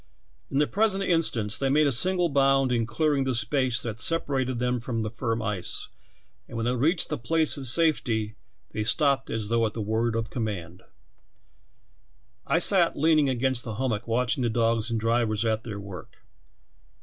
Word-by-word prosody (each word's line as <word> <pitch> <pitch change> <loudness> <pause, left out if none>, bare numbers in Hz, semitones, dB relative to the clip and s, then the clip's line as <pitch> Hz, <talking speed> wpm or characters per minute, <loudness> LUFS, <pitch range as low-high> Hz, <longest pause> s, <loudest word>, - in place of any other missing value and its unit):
In 135 - -2
the 150 - +4
present 195 +2 +1
instance 120 - +1
they 135 - 0
made 150 +3 +3
a 140 - +2
single 180 +7 +2
bound 135 -3 +2
in 115 -2 0
clearing 140 +4 0
the 130 -1 -1
space 125 +2 +2
that 115 -1 -5
separated 135 -4 0
them 125 0 -1
from 115 -1 -3
the 110 - -4
firm 115 -1 -3
ice, 105 -5 -3 0.6
and 115 - -8
when 115 - -2
they 125 +1 0
reached 155 +9 +1
a 150 - -1
place 160 +5 +1
of 135 -3 -7
safety 120 -7 +1 0.4
they 110 - -3
stopped 140 +3 +1
as 110 -2 -3
though 115 0 +1
at 110 - -1
the - - -4
word 110 +2 -1
of 115 0 -3
command. 95 -7 -5 1.7
"I - - +2
sat 175 -1 +3
leaning 155 -2 +3
against 130 -1 0
the 110 -3 -6
hummock 120 -3 -2
watching 120 +2 0
the 120 - +1
dogs 115 0 +1
and 115 -1 -1
drivers 115 -1 0
at 110 0 -1
their 105 -3 -6
work. 100 -4 -11
120 Hz, 180 wpm, -26 LUFS, 110-140 Hz, 1.7 s, the